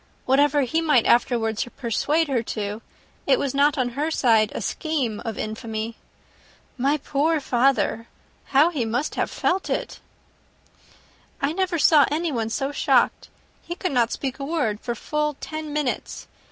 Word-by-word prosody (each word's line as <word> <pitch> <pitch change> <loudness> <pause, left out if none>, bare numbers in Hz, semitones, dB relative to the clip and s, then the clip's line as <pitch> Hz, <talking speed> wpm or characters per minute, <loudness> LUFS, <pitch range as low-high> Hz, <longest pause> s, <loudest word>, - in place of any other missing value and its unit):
Whatever 285 +2 +3
he 315 +5 0
might 295 -8 +3
afterwards 225 -2 +2
persuade 290 +6 0
her 260 -4 0
to, 210 -1 -4 0.5
it - - +5
was 280 - -2
not 285 +1 +3
on 255 -2 +1
her 290 +6 -2
side 225 -8 +3
a - - -2
scheme 275 - -2
of 225 -2 -5
infamy. 220 +1 -4 0.8
My 275 +4 +1
poor 300 +3 0
father! 255 -3 +1 0.4
how 295 +5 +4
he 285 -8 -1
must 240 +6 -2
have - - -1
felt 380 +2 -1
it!" - - -3 1.4
"I 280 +2 0
never 375 -1 0
saw 300 -2 +5
anyone 290 -8 -1
so 270 +4 -2
shocked. - - +1 0.3
He 345 - -6
could 365 -1 -3
not 240 -3 +2
speak 270 0 -4
a - - -4
word 275 -9 -1
for 240 0 -4
full 300 +4 -2
ten 310 -1 -6
minutes. 290 -4 -3
275 Hz, 155 wpm, -23 LUFS, 235-300 Hz, 1.4 s, it